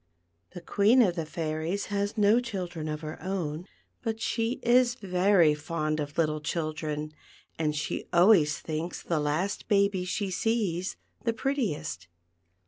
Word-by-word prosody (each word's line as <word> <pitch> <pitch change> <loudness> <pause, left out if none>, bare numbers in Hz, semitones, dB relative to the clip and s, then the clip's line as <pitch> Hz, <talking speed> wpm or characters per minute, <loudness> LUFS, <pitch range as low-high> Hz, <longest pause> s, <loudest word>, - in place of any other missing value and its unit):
The 175 - -6
Queen 210 +8 +4
of 180 -5 +1
the 165 -3 -3
Fairies 160 +4 -2
has 200 +2 -1
no 210 +3 +5
children 180 -9 -4
of 150 0 -4
her 155 0 -7
own. 180 -3 -3 0.3
but 225 -2 -3
she 230 +1 0
is 245 0 +4
very 185 -5 +3
fond 155 0 -2
of 145 -1 -5
little 155 -2 +1
children, 155 -1 -3 0.5
and 150 -2 0
she 150 - -3
always 170 -4 +5
THE - - -33
PEARL 160 - -4
FOUNTAIN. 155 - 0 0.2
3 - - -5
thinks - - -11
the 165 -3 0
last 155 +7 -1
baby 200 -3 +2
she 190 +2 -2
sees 185 -3 -1 0.3
the 230 - +1
prettiest. 195 - -2
175 Hz, 160 wpm, -28 LUFS, 155-205 Hz, 0.5 s, no